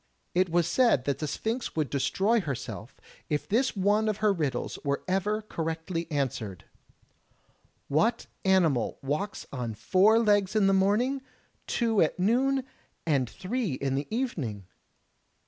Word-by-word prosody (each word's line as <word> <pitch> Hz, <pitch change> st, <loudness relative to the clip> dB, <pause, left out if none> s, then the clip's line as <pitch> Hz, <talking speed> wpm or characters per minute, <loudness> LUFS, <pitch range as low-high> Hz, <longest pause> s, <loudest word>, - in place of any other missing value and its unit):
It 180 Hz, +1 st, +2 dB
was 170 Hz, 0 st, +2 dB
said 225 Hz, -, +3 dB
that 140 Hz, -, -1 dB
the 155 Hz, -, -2 dB
Sphinx 225 Hz, -, -3 dB
would 155 Hz, -5 st, -1 dB
destroy 190 Hz, -, +2 dB
herself 120 Hz, -, -6 dB, 0.3 s
if 150 Hz, -1 st, -1 dB
this 235 Hz, +2 st, +1 dB
one 205 Hz, +3 st, +2 dB
of 210 Hz, -, -1 dB
her 215 Hz, -1 st, +3 dB
riddles 150 Hz, -7 st, -2 dB
were 140 Hz, -1 st, -1 dB
ever 205 Hz, +3 st, 0 dB
correctly 165 Hz, -2 st, -3 dB
answered: 125 Hz, -, -3 dB, 1.2 s
"What 225 Hz, +12 st, +1 dB, 0.2 s
animal 170 Hz, -, +2 dB
walks 150 Hz, +9 st, -3 dB
on 120 Hz, -4 st, -3 dB
four 190 Hz, -, +4 dB
legs 205 Hz, -3 st, +3 dB
in 210 Hz, -2 st, +4 dB
the 195 Hz, -, +4 dB
morning, 215 Hz, +8 st, +2 dB, 0.5 s
two 225 Hz, -4 st, +1 dB
at 155 Hz, -, +2 dB
noon, 255 Hz, +8 st, +2 dB, 0.4 s
and 140 Hz, -7 st, +1 dB
three 190 Hz, -, -3 dB
in 135 Hz, +1 st, -2 dB
the 140 Hz, +2 st, -2 dB
evening?" 155 Hz, -, -3 dB
185 Hz, 140 wpm, -28 LUFS, 140-215 Hz, 1.2 s, four